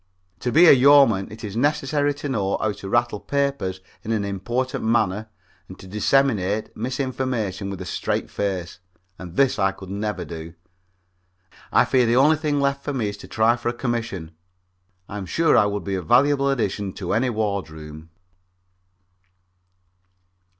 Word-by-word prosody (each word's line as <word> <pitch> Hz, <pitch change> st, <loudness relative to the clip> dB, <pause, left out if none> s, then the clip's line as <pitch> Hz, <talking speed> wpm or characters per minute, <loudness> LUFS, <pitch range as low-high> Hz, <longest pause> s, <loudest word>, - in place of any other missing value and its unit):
To 125 Hz, -, -2 dB
be 165 Hz, +6 st, +6 dB
a -, -, +9 dB
yeoman, 130 Hz, -8 st, +5 dB
it 110 Hz, +1 st, -10 dB
is 105 Hz, -1 st, -6 dB
necessary 145 Hz, +2 st, +1 dB
to 145 Hz, 0 st, -5 dB
know 100 Hz, -6 st, 0 dB
how 110 Hz, -, 0 dB
to 100 Hz, -1 st, -8 dB
rattle 120 Hz, -1 st, +1 dB
papers 140 Hz, -11 st, -2 dB, 0.2 s
in 110 Hz, -, -4 dB
an 105 Hz, -3 st, 0 dB
important 120 Hz, +7 st, -2 dB
manner 110 Hz, -2 st, 0 dB, 0.4 s
and -, -, -11 dB
disseminate 105 Hz, 0 st, 0 dB
misinformation 125 Hz, -5 st, -3 dB
with 100 Hz, -2 st, -6 dB
a -, -, -5 dB
straight -, -, -2 dB
face, 95 Hz, -4 st, -3 dB, 0.4 s
and 90 Hz, -2 st, -9 dB
this 135 Hz, -6 st, +2 dB
I 95 Hz, 0 st, +3 dB
could 95 Hz, -1 st, -11 dB
never 100 Hz, -3 st, -3 dB
do. 80 Hz, +1 st, -8 dB, 1.2 s
I -, -, +5 dB
fear 125 Hz, -2 st, +2 dB
the 120 Hz, -, +2 dB
only 150 Hz, +5 st, +5 dB
thing 150 Hz, -2 st, -1 dB
left 140 Hz, 0 st, 0 dB
for 145 Hz, -, -3 dB
me 115 Hz, -6 st, -1 dB
is 100 Hz, -, -7 dB
to -, -, -12 dB
try 110 Hz, +2 st, +2 dB
for 120 Hz, 0 st, -3 dB
a -, -, -2 dB
commission. 115 Hz, -9 st, -3 dB, 0.8 s
I'm 100 Hz, -2 st, -6 dB
sure 165 Hz, -, +2 dB
I 105 Hz, -, +5 dB
would 100 Hz, 0 st, -3 dB
be 100 Hz, -, -3 dB
a 95 Hz, -, -1 dB
valuable 140 Hz, -, +3 dB
addition 100 Hz, -7 st, -1 dB
to 90 Hz, -3 st, -4 dB
any 120 Hz, +4 st, +1 dB
wardroom. 80 Hz, -8 st, -4 dB
110 Hz, 160 wpm, -23 LUFS, 95-130 Hz, 1.2 s, a